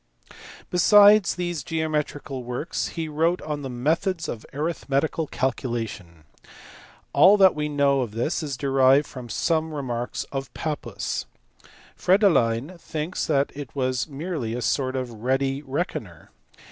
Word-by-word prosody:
Besides 205 +2 +6
these 175 -3 -3
geometrical 150 -4 -3
works 125 +6 -3
he 165 -2 -4
wrote 165 +4 +1
on 150 -1 -4
the 135 - -5
methods 160 - -1
of 110 - -6
arithmetical 155 0 -1
calcidation. 115 - -3 0.9
All 200 +3 +7
that 190 -3 +6
we 150 0 -2
know 140 -2 +2
of 120 - -2
this 120 +11 -1
is 145 -4 -4
derived 135 +1 +4
from 125 -3 -9
some 160 +6 0
remarks 125 -4 -3
of 135 -1 -4
Pappus. 155 -2 -4 0.7
Friedlein 170 - +2
thinks 160 +2 -4
that 140 -2 +1
it 145 -2 -8
was 130 -1 0
merely 145 -6 -4
a 125 - -3
sort 130 -2 0
of 130 -2 -3
ready 135 +4 -1
reckoner. 140 -1 -5
140 Hz, 130 wpm, -24 LUFS, 130-160 Hz, 0.9 s, All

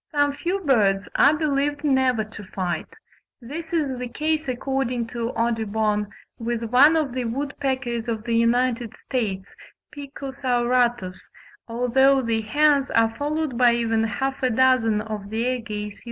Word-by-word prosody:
Some 290 -2 +1
few 360 +6 -2
birds 205 - +2
are 300 - +5
believed 290 -1 -1
never 260 -5 +2
to 215 0 -10
fight; 180 -3 -3 0.5
this 305 +7 -8
is 285 -7 -1
the 250 - -4
case, 310 +5 -1
according 255 -1 -2
to 235 -1 -3
Audubon, 220 -3 0 0.3
with 235 0 -2
one 285 +6 +6
of 290 -5 -1
the 250 -1 -2
woodpeckers 260 -2 -3
of 225 -2 -3
the 235 0 -1
United 235 0 +1
States 200 -7 -3 0.4
(Picu 280 -1 -7
sauratus), 245 -6 0 0.5
although 260 +3 +3
"the 225 -1 0
hens 285 +4 +2
are 225 0 +3
followed 295 -2 -2
by 245 -1 +5
even 225 -1 +1
half 270 +4 -3
a 255 - +2
dozen 225 -3 +3
of 210 -2 -6
their 240 +4 -1
gay 210 -3 -5
suitors." - - -16
245 Hz, 150 wpm, -23 LUFS, 225-275 Hz, 0.5 s, one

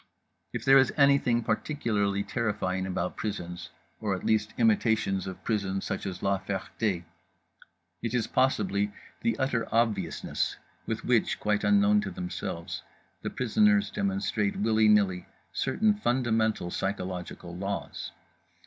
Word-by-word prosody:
If - - -5
there 135 0 +8
is 130 - +3
anything 140 -4 +4
particularly 105 -6 0
terrifying 100 -4 -1
about 90 -1 -2
prisons, 90 -5 -4 0.3
or 105 -3 0
at 90 - -7
least 110 0 +2
imitations 110 - +2
of 95 - -7
prisons 95 -3 -1
such - - -3
as 90 -2 -6
La 100 -1 +2
Ferté, 95 -1 -2 1.0
it 115 - -3
is 115 - +1
possibly 105 -6 +1 0.3
the 235 0 +1
utter 130 -4 0
obviousness 110 -7 0 0.3
with - - -3
which - - +2
(quite 105 -1 0
unknown 205 0 +4
to - - -4
themselves) 85 -1 -5 0.4
the - - -3
prisoners 210 - +3
demonstrate 195 - 0
willy 110 +1 +3
nilly 100 -4 +3 0.3
certain 215 +1 +2
fundamental 115 - 0
psychological 90 -3 -4
laws. 100 +2 -4
105 Hz, 125 wpm, -28 LUFS, 95-130 Hz, 1.0 s, there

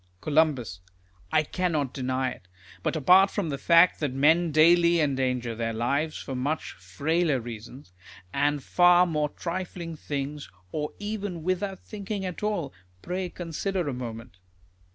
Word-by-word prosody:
Col. 155 +6 +2 0.9
I 155 -1 +4
cannot 155 -5 -1
deny 130 0 -1
it. 90 - -12 0.3
But, - - -1
apart 180 +6 +6
from 195 -6 -2
the 140 -2 -3
fact 170 +4 +5
that 150 -4 -1
men 160 +5 +4
daily 170 +2 +5
endanger 130 -5 0
their 115 0 -2
lives 140 +7 -1
for 135 - -6
much 140 +5 -2
frailer 140 - -1
reasons, 120 -1 -9 0.4
and 145 0 +1
far 175 0 +5
more 150 -3 0
trifling 170 0 -5
things, 145 -1 -5 0.2
or 150 -1 -3
even 205 -5 -4
without 185 +2 -2
thinking 205 -1 -5
at 180 -2 -5
all, 205 -9 -2 0.3
pray 180 +1 -3
consider 175 +1 -3
a 140 - -1
moment. 115 -4 -7
155 Hz, 140 wpm, -27 LUFS, 135-175 Hz, 0.9 s, apart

